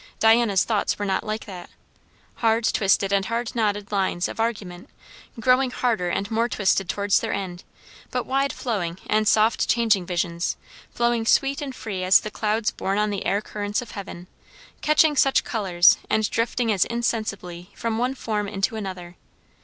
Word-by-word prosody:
Diana's 225 Hz, -3 st, +4 dB
thoughts 215 Hz, -3 st, 0 dB
were 205 Hz, -, -3 dB
not 190 Hz, -1 st, 0 dB
like 215 Hz, 0 st, -4 dB
that, 180 Hz, -4 st, -9 dB, 0.7 s
hard 225 Hz, 0 st, +2 dB
twisted 195 Hz, -1 st, +2 dB
and 195 Hz, -1 st, +2 dB
hard 230 Hz, +2 st, -3 dB
knotted 205 Hz, -3 st, -1 dB
lines 190 Hz, -3 st, 0 dB
of -, -, -8 dB
argument, 200 Hz, -6 st, -3 dB, 0.5 s
growing 255 Hz, +2 st, +3 dB
harder 225 Hz, -8 st, -1 dB
and 200 Hz, +5 st, -2 dB
more 230 Hz, +2 st, +1 dB
twisted 195 Hz, -4 st, +1 dB
towards 200 Hz, -1 st, +2 dB
their 225 Hz, -, -3 dB
end; 185 Hz, -3 st, -5 dB, 0.5 s
but -, -, -2 dB
wide 275 Hz, +1 st, 0 dB
flowing 185 Hz, -8 st, -3 dB
and 215 Hz, 0 st, +1 dB
soft 220 Hz, +2 st, +3 dB
changing 220 Hz, -6 st, +2 dB
visions, 170 Hz, -1 st, -2 dB, 0.3 s
flowing 235 Hz, -1 st, 0 dB
sweet 275 Hz, +3 st, +2 dB
and 270 Hz, -3 st, -5 dB
free 195 Hz, -6 st, -5 dB
as 185 Hz, +1 st, +6 dB
the 215 Hz, -, -6 dB
clouds 215 Hz, +1 st, 0 dB
borne 195 Hz, +1 st, -2 dB
on 210 Hz, 0 st, +1 dB
the 200 Hz, -, -3 dB
air 200 Hz, +1 st, +1 dB
currents 205 Hz, +1 st, -3 dB
of 235 Hz, -, -12 dB
heaven; 190 Hz, -3 st, -8 dB, 0.6 s
catching 305 Hz, 0 st, +4 dB
such 270 Hz, -1 st, +3 dB
colours, 185 Hz, -6 st, +3 dB
and 215 Hz, -1 st, +1 dB
drifting 230 Hz, 0 st, 0 dB
as 195 Hz, -4 st, +3 dB
insensibly 215 Hz, -7 st, -3 dB
from 230 Hz, -1 st, -2 dB
one 250 Hz, +2 st, 0 dB
form 210 Hz, -5 st, -2 dB
into 200 Hz, +4 st, -1 dB
another. 185 Hz, -4 st, -7 dB
210 Hz, 170 wpm, -24 LUFS, 195-230 Hz, 0.7 s, as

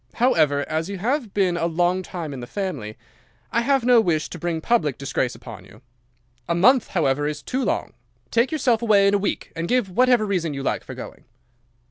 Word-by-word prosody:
However, 155 Hz, -, +2 dB
as 160 Hz, +3 st, -2 dB
you 200 Hz, -, -4 dB
have 240 Hz, +3 st, -1 dB
been 190 Hz, -3 st, +1 dB
a 170 Hz, -1 st, 0 dB
long 175 Hz, +2 st, +1 dB
time 170 Hz, -5 st, -6 dB
in 135 Hz, -, -7 dB
the 120 Hz, -, -7 dB
family, 140 Hz, -, -5 dB, 0.5 s
I 235 Hz, -, +2 dB
have 270 Hz, +1 st, +2 dB
no 245 Hz, -2 st, +6 dB
wish 165 Hz, -6 st, 0 dB
to 175 Hz, -, -8 dB
bring 170 Hz, 0 st, -2 dB
public 160 Hz, -, +1 dB
disgrace 135 Hz, -3 st, -2 dB
upon 115 Hz, -5 st, -11 dB
you. 105 Hz, +6 st, -18 dB, 0.7 s
A 170 Hz, -, +1 dB
month, 240 Hz, +7 st, +4 dB
however 145 Hz, -4 st, 0 dB
is 150 Hz, 0 st, -5 dB
too 260 Hz, +1 st, -2 dB
long. -, -, -2 dB, 0.4 s
Take 235 Hz, +5 st, +2 dB
yourself 255 Hz, -7 st, +1 dB
away 210 Hz, -4 st, +4 dB
in 200 Hz, -, +3 dB
a 205 Hz, -, +3 dB
week, 200 Hz, -, -3 dB
and 165 Hz, +1 st, -3 dB
give 245 Hz, -5 st, +1 dB
what 255 Hz, +7 st, +3 dB
reason 180 Hz, -8 st, -1 dB
you 135 Hz, -, -5 dB
like -, -, -1 dB
for -, -, -9 dB
going." -, -, -10 dB
180 Hz, 205 wpm, -23 LUFS, 150-230 Hz, 0.7 s, no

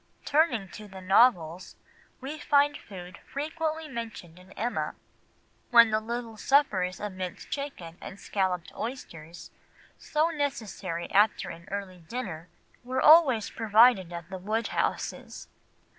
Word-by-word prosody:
Turning 285 Hz, -9 st, +2 dB
to 210 Hz, +2 st, -10 dB
the 190 Hz, -1 st, -10 dB
novels, 185 Hz, -3 st, +3 dB, 0.5 s
we 290 Hz, +4 st, -6 dB
find 290 Hz, 0 st, +3 dB
food 185 Hz, -6 st, -10 dB
frequently 315 Hz, +2 st, -4 dB
mentioned 225 Hz, -, -7 dB
in 185 Hz, +1 st, -17 dB
Emma, 240 Hz, +3 st, -2 dB, 0.7 s
when 235 Hz, -2 st, +7 dB
the 215 Hz, -, +2 dB
little 230 Hz, 0 st, -5 dB
suppers 205 Hz, -9 st, +2 dB
of 210 Hz, 0 st, -4 dB
minced 185 Hz, -1 st, -7 dB
chicken 185 Hz, -, -6 dB
and 200 Hz, 0 st, -9 dB
scalloped 185 Hz, -4 st, -2 dB
oysters, 170 Hz, -9 st, -7 dB, 0.5 s
so 310 Hz, +2 st, +1 dB
necessary 220 Hz, -, -3 dB
after 200 Hz, -2 st, +3 dB
an 170 Hz, +1 st, -12 dB
early 195 Hz, -2 st, -5 dB
dinner, 170 Hz, -3 st, -6 dB, 0.4 s
were 255 Hz, +1 st, -2 dB
always 295 Hz, -9 st, +6 dB
provided 220 Hz, -4 st, +4 dB
at 170 Hz, -1 st, -7 dB
the 190 Hz, -, -5 dB
Woodhouses. 215 Hz, +5 st, -2 dB
215 Hz, 125 wpm, -28 LUFS, 185-260 Hz, 0.7 s, when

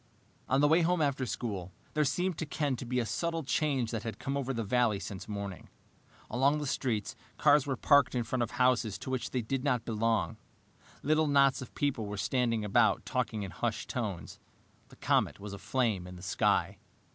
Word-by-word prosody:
On 135 Hz, +2 st, +3 dB
the 145 Hz, -, +5 dB
way 160 Hz, +3 st, +5 dB
home 175 Hz, +1 st, +2 dB
after 140 Hz, -4 st, 0 dB
school, 100 Hz, -5 st, -4 dB, 0.2 s
there 155 Hz, -, +2 dB
seemed 175 Hz, +6 st, 0 dB
to -, -, -1 dB
Ken 145 Hz, -2 st, -1 dB
to 125 Hz, -, -6 dB
be 125 Hz, +1 st, -1 dB
a 120 Hz, -, 0 dB
subtle 165 Hz, +11 st, -2 dB
change 135 Hz, -4 st, 0 dB
that 115 Hz, -, -2 dB
had 115 Hz, -, -5 dB
come 135 Hz, -1 st, -3 dB
over 135 Hz, -1 st, -1 dB
the 115 Hz, -3 st, -2 dB
valley 110 Hz, -1 st, +2 dB
since 95 Hz, 0 st, -7 dB
morning. 100 Hz, -4 st, -6 dB, 0.6 s
Along 135 Hz, +5 st, +2 dB
the 150 Hz, -, -3 dB
streets, 115 Hz, -6 st, -1 dB, 0.2 s
cars 145 Hz, -1 st, +4 dB
were 135 Hz, -, 0 dB
parked 140 Hz, -2 st, +4 dB
in 120 Hz, -, +1 dB
front 120 Hz, +2 st, -2 dB
of 120 Hz, -, 0 dB
houses 125 Hz, -5 st, +2 dB
to 130 Hz, -, -6 dB
which 130 Hz, -2 st, -2 dB
they 125 Hz, -2 st, -2 dB
did 130 Hz, +3 st, -2 dB
not 125 Hz, -5 st, +1 dB
belong. 110 Hz, -2 st, 0 dB, 0.7 s
Little 155 Hz, +1 st, +3 dB
knots 140 Hz, -1 st, +4 dB
of 130 Hz, -, -10 dB
people 130 Hz, -7 st, -1 dB
were 105 Hz, 0 st, -5 dB
standing 115 Hz, +1 st, 0 dB
about, 100 Hz, -, +3 dB
talking 105 Hz, -2 st, -1 dB
in 95 Hz, -, -6 dB
hushed -, -, -3 dB
tones. 100 Hz, -10 st, -4 dB, 0.5 s
The -, -, -16 dB
comet -, -, +1 dB
was 100 Hz, 0 st, -7 dB
aflame 105 Hz, -3 st, -1 dB
in 90 Hz, -, -9 dB
the 90 Hz, -, -11 dB
sky. 95 Hz, -, +1 dB
125 Hz, 200 wpm, -31 LUFS, 105-140 Hz, 0.7 s, the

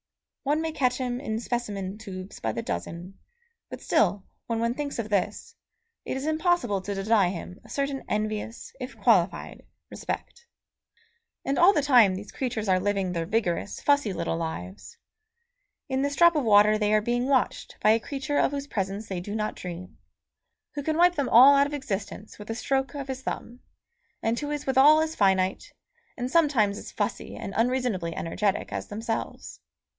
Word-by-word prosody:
One 295 Hz, +2 st, +1 dB
may 325 Hz, 0 st, -2 dB
catch 255 Hz, -5 st, +1 dB
him 250 Hz, -2 st, -2 dB
in 220 Hz, -5 st, -2 dB
specimen 210 Hz, -5 st, -4 dB
tubes 190 Hz, -3 st, -8 dB
by 110 Hz, -, -1 dB
the 115 Hz, -, -4 dB
dozen; 170 Hz, -, -5 dB, 0.5 s
but -, -, -7 dB
still, 200 Hz, -1 st, +1 dB, 0.2 s
when 230 Hz, -1 st, -1 dB
one 235 Hz, +1 st, +1 dB
thinks 285 Hz, +1 st, -4 dB
of 225 Hz, -2 st, -3 dB
this, 200 Hz, -3 st, -2 dB, 0.5 s
it -, -, -3 dB
is 265 Hz, -, -4 dB
impossible 315 Hz, -, +1 dB
to 200 Hz, +2 st, -4 dB
deny 195 Hz, -1 st, +3 dB
him 180 Hz, 0 st, -7 dB
a -, -, -17 dB
certain 275 Hz, -1 st, -2 dB
envious, 215 Hz, +2 st, -3 dB
if -, -, -7 dB
qualified, -, -, +1 dB, 0.3 s
respect. 475 Hz, 0 st, -6 dB, 1.0 s
And 275 Hz, -, 0 dB
all 350 Hz, +3 st, +8 dB
the 300 Hz, -7 st, +1 dB
time 240 Hz, -9 st, +5 dB
these 205 Hz, +2 st, -8 dB
creatures 240 Hz, -5 st, -3 dB
are 185 Hz, -1 st, +3 dB
living 195 Hz, -1 st, 0 dB
their 165 Hz, -2 st, -2 dB
vigorous, 205 Hz, -2 st, -1 dB
fussy 285 Hz, -7 st, +2 dB
little 180 Hz, -, -2 dB
lives; 105 Hz, -, -6 dB, 0.9 s
in 265 Hz, 0 st, -1 dB
this 285 Hz, 0 st, -1 dB
drop 340 Hz, +1 st, +6 dB
of 295 Hz, -, +1 dB
water 210 Hz, -1 st, +5 dB
they 210 Hz, -1 st, +1 dB
are 215 Hz, -, +3 dB
being 240 Hz, +3 st, 0 dB
watched 270 Hz, -2 st, 0 dB
by 215 Hz, -, +4 dB
a 225 Hz, -, +4 dB
creature 280 Hz, +4 st, -2 dB
of -, -, +3 dB
whose 280 Hz, 0 st, -4 dB
presence 200 Hz, -3 st, -3 dB
they 190 Hz, -2 st, -3 dB
do 205 Hz, +4 st, -5 dB
not 215 Hz, -1 st, -2 dB
dream, 180 Hz, 0 st, -8 dB, 0.7 s
who 290 Hz, -, -3 dB
can 310 Hz, +2 st, -1 dB
wipe 350 Hz, +1 st, +5 dB
them 285 Hz, -6 st, -1 dB
all 265 Hz, +4 st, +8 dB
out 280 Hz, 0 st, +4 dB
of 295 Hz, -, -4 dB
existence 210 Hz, -5 st, -5 dB
with 210 Hz, -, -10 dB
a 225 Hz, -, -2 dB
stroke 270 Hz, +3 st, -1 dB
of 275 Hz, -1 st, -5 dB
his 265 Hz, -1 st, -5 dB
thumb, 245 Hz, -1 st, -5 dB, 0.6 s
and 230 Hz, +1 st, 0 dB
who 290 Hz, -, -4 dB
is 295 Hz, -1 st, -3 dB
withal 280 Hz, +4 st, +6 dB
as 315 Hz, 0 st, -1 dB
finite, 190 Hz, -2 st, +1 dB, 0.5 s
and 250 Hz, 0 st, -3 dB
sometimes 265 Hz, -12 st, +3 dB
as -, -, -9 dB
fussy -, -, -3 dB
and 195 Hz, -, -6 dB
unreasonably 230 Hz, -8 st, 0 dB
energetic, 195 Hz, +4 st, -1 dB
as -, -, -4 dB
themselves. 225 Hz, +2 st, -5 dB
225 Hz, 180 wpm, -26 LUFS, 195-275 Hz, 1.0 s, all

